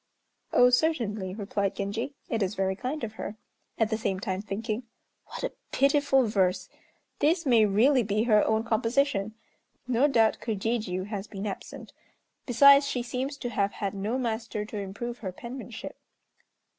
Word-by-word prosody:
"Oh, 245 Hz, 0 st, +6 dB
certainly," 220 Hz, -, 0 dB
replied 200 Hz, -1 st, -2 dB
Genji. 220 Hz, +8 st, -3 dB
"It 225 Hz, -2 st, -1 dB
is 195 Hz, +1 st, 0 dB
very 190 Hz, 0 st, 0 dB
kind 260 Hz, +8 st, -4 dB
of 220 Hz, -, -3 dB
her," 210 Hz, -, -5 dB, 0.4 s
at 225 Hz, -1 st, +1 dB
the 220 Hz, -, 0 dB
same 190 Hz, -4 st, -1 dB
time 190 Hz, 0 st, -3 dB
thinking, 215 Hz, +3 st, -3 dB, 0.5 s
"What -, -, -7 dB
a -, -, -1 dB, 0.2 s
pitiful 275 Hz, -1 st, +3 dB
verse! 190 Hz, -4 st, +1 dB, 0.5 s
This 330 Hz, +3 st, +2 dB
may 230 Hz, -5 st, +5 dB
really 250 Hz, +7 st, +4 dB
be 215 Hz, 0 st, 0 dB
her 215 Hz, -3 st, +4 dB
own 220 Hz, 0 st, +1 dB
composition. 225 Hz, -2 st, 0 dB, 0.5 s
No 255 Hz, +3 st, +3 dB
doubt 225 Hz, -6 st, +3 dB
Kojijiû 210 Hz, -4 st, -2 dB
has 205 Hz, -1 st, -5 dB
been 200 Hz, -1 st, -6 dB
absent, 200 Hz, -2 st, -7 dB, 0.5 s
besides 280 Hz, +3 st, +7 dB
she 245 Hz, -3 st, -2 dB
seems 260 Hz, +4 st, -3 dB
to 245 Hz, -, -4 dB
have 200 Hz, -3 st, 0 dB
had 200 Hz, -2 st, -3 dB
no 205 Hz, +5 st, -2 dB
master 225 Hz, -3 st, -3 dB
to 215 Hz, -, -7 dB
improve 220 Hz, +5 st, -5 dB
her 190 Hz, -4 st, -4 dB
penmanship. 240 Hz, +7 st, -8 dB
225 Hz, 155 wpm, -28 LUFS, 200-250 Hz, 0.5 s, besides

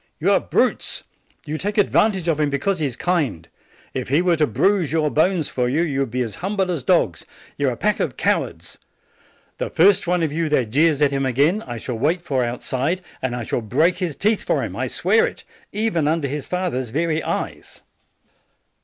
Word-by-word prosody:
You -, -, +2 dB
are -, -, +5 dB
brutes! -, -, 0 dB, 0.4 s
You 155 Hz, +1 st, -4 dB
take 205 Hz, +2 st, -2 dB
advan 210 Hz, +1 st, +4 dB
tage 185 Hz, -3 st, -5 dB
of 160 Hz, -3 st, +1 dB
him 150 Hz, -1 st, +2 dB
because 160 Hz, +7 st, -1 dB
he 150 Hz, -, +1 dB
is 125 Hz, -, -5 dB
kind. 140 Hz, -, -1 dB, 0.5 s
II 130 Hz, -, -1 dB
he 140 Hz, +5 st, +2 dB
were 180 Hz, -2 st, +3 dB
to 155 Hz, -2 st, +2 dB
bruise 190 Hz, -6 st, +1 dB
your 155 Hz, -2 st, +1 dB
bones 165 Hz, 0 st, +2 dB
for 125 Hz, -1 st, -1 dB
you, 155 Hz, +6 st, +1 dB
you 140 Hz, -5 st, -1 dB
would 135 Hz, -3 st, 0 dB
be 125 Hz, +2 st, -1 dB
as 115 Hz, -3 st, -5 dB
humble 195 Hz, 0 st, 0 dB
as 165 Hz, -5 st, -2 dB
dogs. 125 Hz, -, +1 dB, 0.3 s
You -, -, 0 dB
are -, -, -2 dB
a -, -, -9 dB
pack -, -, +1 dB
of -, -, -2 dB
cowards! -, -, -1 dB, 0.8 s
The -, -, -2 dB
first 195 Hz, +2 st, +4 dB
one 175 Hz, -1 st, +1 dB
of 155 Hz, -3 st, -1 dB
you 165 Hz, 0 st, 0 dB
that 130 Hz, -7 st, +1 dB
jeers 150 Hz, +2 st, +3 dB
at 140 Hz, -, +3 dB
him 135 Hz, 0 st, 0 dB
again, 140 Hz, -, +2 dB
I 120 Hz, -1 st, -5 dB
shall 115 Hz, 0 st, -5 dB
wait 165 Hz, +7 st, +1 dB
for 135 Hz, -6 st, 0 dB
outside, 130 Hz, +8 st, -2 dB, 0.2 s
and 130 Hz, -2 st, -2 dB
I 120 Hz, -, -4 dB
shall 120 Hz, -, -2 dB
break 155 Hz, -, +2 dB
his 175 Hz, -6 st, -2 dB
teeth 215 Hz, +1 st, +1 dB
for -, -, 0 dB
him, -, -, -5 dB
I -, -, -2 dB
swear 450 Hz, +2 st, +2 dB
it, -, -, -9 dB, 0.3 s
even 205 Hz, -8 st, 0 dB
un 160 Hz, +2 st, +1 dB
der 140 Hz, -, -1 dB
his 145 Hz, +1 st, -4 dB
father's 175 Hz, -10 st, -2 dB
very 160 Hz, +5 st, 0 dB
eyes!" -, -, -5 dB
155 Hz, 215 wpm, -21 LUFS, 130-180 Hz, 0.8 s, are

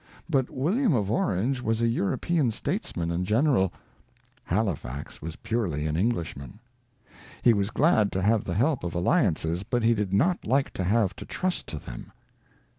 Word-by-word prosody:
But 135 Hz, -6 st, +1 dB
William 185 Hz, -, +1 dB
of 105 Hz, -3 st, 0 dB
Orange 130 Hz, -, 0 dB
was 115 Hz, -1 st, 0 dB
a 115 Hz, -, +2 dB
European 125 Hz, -, +1 dB
statesman 85 Hz, -5 st, -3 dB
and 85 Hz, +2 st, -1 dB
general; 110 Hz, -, +2 dB, 0.7 s
Halifax 80 Hz, -, -3 dB
was 80 Hz, +1 st, -6 dB
purely 105 Hz, -10 st, -2 dB
an 75 Hz, 0 st, -1 dB
Englishman. 85 Hz, -, -2 dB, 0.8 s
He 120 Hz, -, +6 dB
was 100 Hz, -1 st, 0 dB
glad 115 Hz, -7 st, +3 dB
to 95 Hz, -, 0 dB
have 110 Hz, +1 st, +3 dB
the 90 Hz, -, -3 dB
help 130 Hz, -, +1 dB
of 85 Hz, -1 st, -4 dB
alliances, 90 Hz, -, +1 dB
but 120 Hz, +4 st, -1 dB
he 115 Hz, +1 st, +5 dB
did 105 Hz, -4 st, -2 dB
not 170 Hz, -, +2 dB
like 135 Hz, +4 st, +1 dB
to 95 Hz, -, -3 dB
have 100 Hz, +1 st, +2 dB
to -, -, -8 dB
trust 185 Hz, -1 st, -2 dB
to 80 Hz, -, -5 dB
them. -, -, -9 dB
105 Hz, 165 wpm, -27 LUFS, 90-130 Hz, 0.8 s, He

